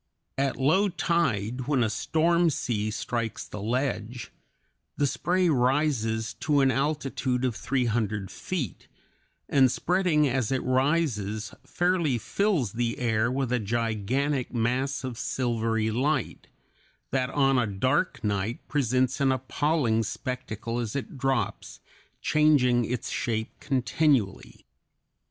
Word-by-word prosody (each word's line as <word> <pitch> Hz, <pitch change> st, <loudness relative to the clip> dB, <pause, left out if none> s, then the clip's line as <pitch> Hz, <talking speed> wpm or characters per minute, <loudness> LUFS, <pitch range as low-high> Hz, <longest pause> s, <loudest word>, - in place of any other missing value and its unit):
At 135 Hz, 0 st, 0 dB
low 185 Hz, +10 st, +3 dB
tide, 125 Hz, -, 0 dB
when 135 Hz, -4 st, +2 dB
a -, -, +2 dB
storm 170 Hz, +7 st, +2 dB
sea 110 Hz, -7 st, -1 dB
strikes 115 Hz, +1 st, -3 dB
the 105 Hz, -, -7 dB
ledge, 120 Hz, 0 st, -2 dB, 0.7 s
the 145 Hz, -, +2 dB
spray 180 Hz, +6 st, +1 dB
rises 125 Hz, -5 st, +1 dB
to 145 Hz, -2 st, +2 dB
an 135 Hz, -1 st, +4 dB
altitude 135 Hz, -2 st, -1 dB
of 125 Hz, -3 st, -1 dB
three 130 Hz, +1 st, -1 dB
hundred 105 Hz, -4 st, -1 dB
feet, 150 Hz, -, -4 dB, 0.6 s
and 130 Hz, -3 st, +4 dB
spreading 175 Hz, -4 st, +2 dB
as 130 Hz, -3 st, 0 dB
it 130 Hz, -, 0 dB
rises, 130 Hz, -6 st, 0 dB
fairly 175 Hz, -7 st, +1 dB
fills 150 Hz, -, 0 dB
the 115 Hz, +1 st, -1 dB
air 115 Hz, -1 st, +1 dB
with 130 Hz, -2 st, -1 dB
a 125 Hz, -, +2 dB
gigantic 120 Hz, +5 st, -1 dB
mass 125 Hz, +4 st, -1 dB
of 125 Hz, -3 st, -5 dB
silvery 115 Hz, -3 st, 0 dB
light, 135 Hz, +3 st, -1 dB, 0.6 s
that 130 Hz, -1 st, 0 dB
on 135 Hz, -2 st, +3 dB
a 120 Hz, -, +1 dB
dark 130 Hz, -, 0 dB
night 105 Hz, +2 st, -2 dB
presents 130 Hz, -1 st, +1 dB
an 135 Hz, -1 st, +4 dB
appalling 130 Hz, -2 st, +1 dB
spectacle 115 Hz, 0 st, -4 dB
as 115 Hz, -1 st, -3 dB
it 140 Hz, -, -4 dB
drops, 135 Hz, -5 st, -2 dB, 0.4 s
changing 135 Hz, -6 st, +3 dB
its 120 Hz, +1 st, -3 dB
shape 110 Hz, -2 st, -2 dB
continually. 125 Hz, -, 0 dB
125 Hz, 125 wpm, -27 LUFS, 115-145 Hz, 0.7 s, an